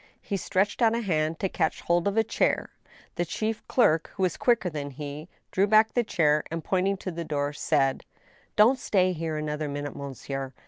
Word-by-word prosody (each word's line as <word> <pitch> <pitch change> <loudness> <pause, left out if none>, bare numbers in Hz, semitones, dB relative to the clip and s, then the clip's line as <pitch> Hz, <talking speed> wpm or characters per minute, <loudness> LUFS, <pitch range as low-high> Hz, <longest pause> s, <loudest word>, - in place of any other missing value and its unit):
He 200 - -4
stretched 195 +3 0
out 230 -1 +4
a 235 - -1
hand 160 -5 0
to 195 - 0
catch 160 -3 -1
hold 170 +2 +1
of 200 +2 -1
a 225 - +5
chair. 225 - 0 0.5
The 175 - +2
chief 215 +6 -3
clerk, 165 -10 +3
who 190 - -1
was 180 - +1
quicker 235 -6 +2
than 150 -4 -4
he, 145 +3 -7 0.2
drew 195 +2 +2
back 215 +1 +5
the 240 - +2
chair, 150 -7 +2
and, 165 0 -4
pointing 190 +1 +1
to 185 - -5
the 170 0 -4
door, 145 -2 -2
said: 140 -3 +1 0.5
"Don't 235 +5 +5
stay 185 -5 +2
here 160 -2 -3
another 150 0 -3
minute, 145 0 -5
monsieur! 135 -1 -6
170 Hz, 195 wpm, -27 LUFS, 150-200 Hz, 0.5 s, a